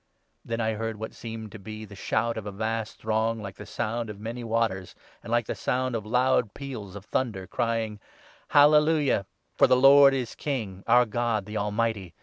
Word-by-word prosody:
Then 115 0 -3
I 110 -1 0
heard 115 +1 -3
' - - -13
what 110 - -6
seemed 110 -2 -7
to 110 - -9
be 110 +2 -8
the 105 - -13
shout 115 +4 -1
of 110 -2 -6
a - - -4
vast 110 +2 -3
6 - - -27
throng, 110 +1 0
like 100 -2 -8
the 105 - -10
sound 115 +2 -3
of 105 -1 -8
many 115 +3 -5
waters,' 110 -5 -1 0.3
and - - -10
like 120 0 +2
the - - -3
sound 125 +5 -1
of 105 -2 -4
loud 125 -2 +2
peals 115 -9 -7
of 100 0 -9
thunder, 110 -5 -2
crying 115 -1 -2
— - - -25
' - - -32
Hallelujah! 150 -7 +5 0.3
For - - +5
the 130 0 +5
Lord 135 +1 +7
is 125 -4 -3
King, 110 -10 -4
our 125 0 +6
God, 115 -2 -1
the 105 +1 -8
Almighty. 105 -3 -1
115 Hz, 210 wpm, -27 LUFS, 105-120 Hz, 0.3 s, Lord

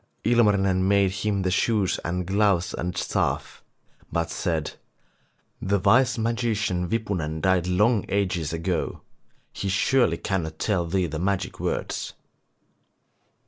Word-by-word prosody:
Ilmarinen 100 -5 +3
made 100 -1 +3
him 100 0 -1
the 90 - 0
shoes 100 0 +1
and 90 +1 -2
gloves 95 -2 +1
and 90 +1 -4
staff, - - -2 0.5
but 85 0 -1
said: 80 -4 -2 0.9
'The 100 +1 +1
wise 120 +7 +3
magician 110 -6 -1
Wipunen 90 -9 -2
died 90 +1 +2
long 105 +4 +2
ages 90 -5 0
ago, 85 +1 -2 0.5
he 100 - -3
surely 95 -2 +2
cannot 80 -5 -3
tell 90 -4 0
thee 95 +1 +1
the 80 -1 -4
magic 95 +1 -2
words. - - -3
95 Hz, 120 wpm, -25 LUFS, 85-105 Hz, 0.9 s, Ilmarinen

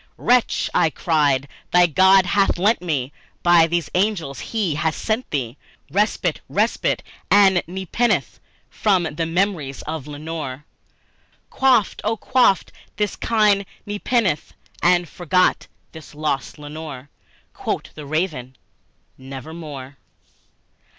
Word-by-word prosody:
"Wretch," 245 -1 +2
I 160 - +3
cried, 145 -3 +1 0.2
"thy 180 0 +5
God 190 +3 +5
hath 195 +1 +2
lent 205 +6 +3
thee 145 -7 -2 0.3
by 175 -2 +6
these 170 0 -1
angels 180 - 0
He 210 -8 -1
hath 160 +1 -1
sent 225 +3 -2
thee 130 -3 -3 0.3
Respite 210 +3 0
respite - - 0 0.3
and 195 -3 +5
nepenthe 190 +6 -1 0.3
from 195 -4 +1
my 160 +1 -2
memories 165 -5 -1
of 155 -2 -5
Lenore! 150 -2 -6 0.9
Quaff, 255 -6 +3
oh, 225 +2 0
quaff 250 -5 +3 0.3
this 210 0 -1
kind 210 -3 +2 0.2
nepenthe, 205 -4 -1 0.3
and 175 0 +3
forget 180 +3 +1 0.2
this 160 -2 -12
lost 150 -2 -2
Lenore!" 145 -2 -8 0.4
Quoth - - -4
the 150 -2 -9
Raven, 150 -5 -2 0.6
"Nevermore." 135 0 -8
170 Hz, 110 wpm, -21 LUFS, 150-200 Hz, 0.9 s, by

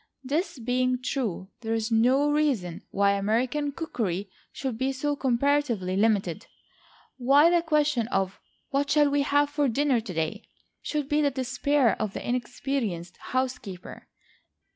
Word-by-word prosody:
This 300 +6 -1
being 250 +1 0
true, 230 -8 -3
there 225 -1 -2
is 225 +1 -2
no 255 +6 +3
reason 265 - 0
why 200 0 +2
American 240 +9 0
cookery 205 - -3 0.2
should 265 -4 -4
be 260 +4 0
so 290 +2 -1
comparatively 255 -7 +1
limited 200 -2 +1 0.7
why 280 +6 +5
the 345 -1 +4
question 300 -7 +1
of 195 -4 -1 0.3
"what 280 +1 0
shall 295 -1 +4
we 285 0 +2
have 285 +1 +2
for 290 -1 +1
dinner 265 0 +2
to 210 -5 -7
day?" 160 +7 -2 0.4
should 295 -3 -2
be 295 +1 +2
the 290 - +3
despair 265 -1 +1
of 210 -2 -2
the - - -6
inexperienced 240 -8 -2
housekeeper. 250 -8 -4
255 Hz, 140 wpm, -27 LUFS, 215-285 Hz, 0.7 s, why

